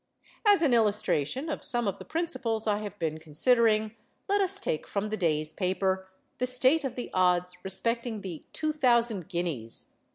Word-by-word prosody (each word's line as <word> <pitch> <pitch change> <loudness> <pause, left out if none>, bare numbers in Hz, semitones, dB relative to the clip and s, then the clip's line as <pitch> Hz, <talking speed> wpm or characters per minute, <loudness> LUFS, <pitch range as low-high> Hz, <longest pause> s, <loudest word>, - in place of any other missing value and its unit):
As 405 -5 +6
an 280 -6 +3
illustration 215 - +1
of 310 - -4
some 240 -3 +1
of 195 - -2
the - - -9
principles 265 -10 -2
I 210 -1 +1
have 205 -1 -7
been 160 -3 -2
considering, 215 - +2 0.3
let 405 0 +2
us 380 - +3
take 155 - -2
from 205 +1 -2
the 215 - -1
day's 155 -4 0
paper, 190 0 -1 0.3
the 250 - +1
state 260 +5 +4
of 265 -3 -3
the 245 - -6
odds 180 0 +1
respecting 230 +3 -1
the 175 -5 -7
'Two 310 0 -1
Thousand 235 - +2
Guineas. 165 - -4
215 Hz, 170 wpm, -28 LUFS, 180-250 Hz, 0.3 s, As